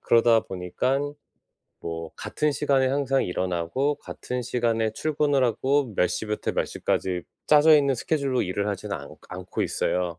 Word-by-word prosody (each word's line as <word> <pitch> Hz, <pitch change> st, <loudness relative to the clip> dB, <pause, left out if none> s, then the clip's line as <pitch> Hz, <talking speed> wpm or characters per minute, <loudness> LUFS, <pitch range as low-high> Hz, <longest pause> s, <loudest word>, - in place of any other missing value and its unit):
그러다 115 Hz, -1 st, +4 dB
보니깐 130 Hz, +11 st, -2 dB, 0.7 s
뭐 80 Hz, -1 st, -5 dB
같은 150 Hz, -1 st, -1 dB
시간에 135 Hz, -2 st, +2 dB
항상 135 Hz, -1 st, +1 dB
일어나고, 90 Hz, -, -1 dB
같은 125 Hz, 0 st, -5 dB
시간에 115 Hz, -2 st, 0 dB
출근을 145 Hz, -1 st, +1 dB
하고, 130 Hz, +1 st, +1 dB
몇 90 Hz, -, +3 dB
시부터 105 Hz, -1 st, -2 dB
몇 -, -, 0 dB
시까지 90 Hz, -2 st, -1 dB, 0.2 s
짜져 155 Hz, +1 st, +7 dB
있는 140 Hz, -2 st, +3 dB
스케줄로 135 Hz, -1 st, 0 dB
일을 100 Hz, +2 st, -2 dB
하지는 100 Hz, 0 st, -3 dB
않 70 Hz, -2 st, -10 dB
않고 90 Hz, +1 st, -4 dB
있어요. 90 Hz, -2 st, -1 dB
120 Hz, 325 characters per minute, -25 LUFS, 95-140 Hz, 0.7 s, 짜져